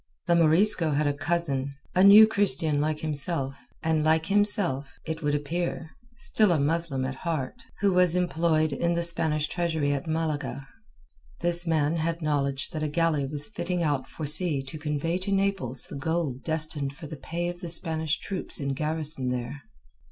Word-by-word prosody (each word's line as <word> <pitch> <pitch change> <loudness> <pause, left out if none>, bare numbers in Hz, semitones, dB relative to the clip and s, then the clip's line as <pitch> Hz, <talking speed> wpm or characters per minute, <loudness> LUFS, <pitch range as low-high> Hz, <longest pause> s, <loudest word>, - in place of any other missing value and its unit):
The 175 - +3
Morisco 170 0 +4
had 150 +2 +1
a 145 - +1
cousin—a 140 +1 -1
New 205 +2 +10
Christian 160 -8 +1
like 155 0 -1
himself, 145 -2 -2 0.2
and 160 -1 +1
like 160 +1 +2
himself, 195 - +1
it 160 0 -4
would 145 -1 0
appear, 160 +2 -3 0.3
still 215 -4 +2
a 165 - +2
Muslim 145 -2 0
at 135 - -3
heart—who 165 +6 -3
was 180 -1 +3
employed 165 -3 +1
in 170 +5 0
the 170 - 0
Spanish 155 -3 0
treasury 160 -4 -1
at 140 +3 -4
Malaga. 155 -3 -3 0.7
This 175 0 +1
man 160 0 +1
had 165 +1 -1
knowledge 140 -4 -1
that 155 - -4
a 155 - 0
galley 150 -2 +1
was 145 +1 -2
fitting 180 -4 -2
out 145 -4 -1
for 155 - -6
sea 150 -1 +1
to 145 +4 -8
convey 150 +3 -2
to 195 +2 -4
Naples 195 -11 +2
the - - -8
gold 150 -3 -2
destined 155 -3 -1
for 165 +1 -10
the 155 +1 -7
pay 170 +5 -4
of 175 0 -5
the 175 - -5
Spanish 160 -2 -1
troops 195 -2 -5
in 140 -1 -2
garrison 150 -2 -2
there. 125 +3 -4
160 Hz, 170 wpm, -27 LUFS, 145-170 Hz, 0.7 s, New